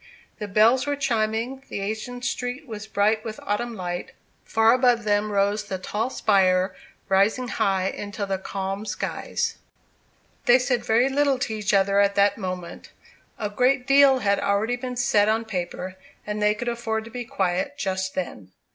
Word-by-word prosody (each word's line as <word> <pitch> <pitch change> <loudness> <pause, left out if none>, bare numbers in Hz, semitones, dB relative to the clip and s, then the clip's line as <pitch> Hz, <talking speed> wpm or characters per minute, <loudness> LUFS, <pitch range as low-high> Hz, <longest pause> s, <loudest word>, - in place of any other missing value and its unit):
The 210 - -4
bells 225 +7 +4
were 290 - +1
chiming; 235 0 -1
the - - -4
ancient 220 +5 -4
street 250 +4 -3
was 215 -2 -7
bright 215 +1 +1
with 220 -2 -6
autumn 230 +3 -2
light; 175 -2 -5 0.3
far 225 +1 +4
above 245 -2 +3
them 210 0 +1
rose 205 +1 +1
the 190 -2 -4
tall 210 +6 -2
spire, 185 -5 +2 0.3
rising 205 +6 +2
high 190 -1 +1
into 205 0 -5
the 195 -1 -2
calm 195 +1 -4
skies. - - -3 0.9
They 245 - +7
said 250 -2 0
very 235 +2 +3
little 275 0 +2
to 240 -3 -2
each 210 -1 -1
other 195 0 +3
at 200 0 +3
that 200 0 +4
moment. 185 -4 -6 0.5
A 210 - -2
great 250 +4 +2
deal 275 0 +6
had 200 -5 +1
already 210 +4 +1
been 250 0 -5
said 215 -4 +3
on 225 +1 +1
paper, 185 -2 -4 0.3
and 210 0 -3
they 210 0 +3
could 240 +3 -5
afford 235 -2 -2
to 230 - -12
be 245 +1 -5
quiet 240 +3 -1
just 190 -5 -2
then. 100 - -5
215 Hz, 170 wpm, -24 LUFS, 200-245 Hz, 0.9 s, They